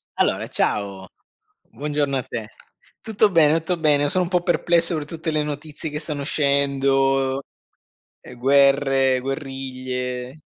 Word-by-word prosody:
Allora - - 0
ciao, 100 -2 -1 0.6
buongiorno 145 -1 -2
a 130 - -1
te. 110 -3 -6 0.5
Tutto 215 -1 +1
bene, 160 -3 +4
tutto 170 +2 -3
bene, 145 -2 +3
sono 185 +2 +1
un - - -5
po' 180 -1 +1
perplesso 170 -1 +2
per 150 -1 -4
tutte 160 +1 -4
le 155 -1 0
notizie 150 +1 -5
che 150 - -4
stanno 150 -2 -4
uscendo. 135 -1 +1 0.8
Eh - - -12
guerre, 135 0 +3
guerriglie. 130 -1 -5
140 Hz, 130 wpm, -22 LUFS, 135-155 Hz, 0.8 s, bene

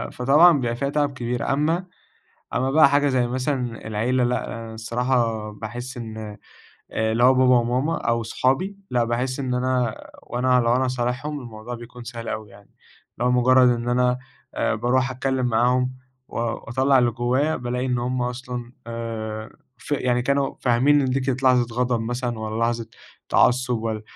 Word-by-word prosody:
فطبعًا 150 +8 +6
بيبقى 120 -2 -1
فيها 140 +3 -2
تعب 145 -1 0
كبير، 125 +1 -2
أمّا 165 +6 0 0.7
أمّا 130 +1 +1
بقى 155 0 +6
حاجة 145 0 +3
زي 125 -2 +2
مثلًا 125 -2 -3
العيلة 120 +4 0
لأ 115 -2 -3
الصراحة 115 -1 -1
باحس 120 +5 -7
إن 110 -2 -7 0.7
آآ 110 0 0
اللي 120 +2 +2
هو 130 +1 +7
بابا 130 0 +5
وماما 125 +7 0
أو 115 0 0
صحابي، 135 - 0
لأ 120 -1 +2
باحس 125 +3 -2
إن 130 -2 -2
أنا 125 -2 0 0.3
وأنا 125 +1 +1
لو 120 +1 +2
أنا 130 - +1
هاصالحهم، 130 +4 -2
الموضوع 120 0 -8
بيكون 120 +1 -10
سهل 115 -1 -7
أوي 110 -1 -5
يعني، 100 0 -18 0.5
اللي 120 - -1
هو - - +3
مجرّد 125 +1 +5
إن 120 0 0
أنا 125 0 +2 0.4
آآ - - 0
باروح 125 +4 +1
اتكلّم 130 0 -1
معاهم، 125 +2 +2 0.4
و - - -10
واطلّع 130 +3 +1
اللي 120 -1 +3
جوايا 130 +6 0
بالاقي 125 +1 -3
إن 125 -1 0
هُم 125 +1 -1
أصلًا 125 -1 -5
آآ 110 -2 -5 0.3
ف 110 - -13
يعني 125 -3 +1
كانوا 140 +2 0
فاهمين 130 +4 +4
إن 130 -2 0
دي 135 +1 +1
كانت 130 0 -2
لحظة 125 -2 +3
غضب 125 -2 +1
مثلًا 120 0 -3
والّا 110 0 -4
لحظة 115 -1 -1 0.4
تعصُّب، 125 -1 +3
والّا 110 -1 -3
125 Hz, 170 wpm, -23 LUFS, 115-130 Hz, 0.7 s, هو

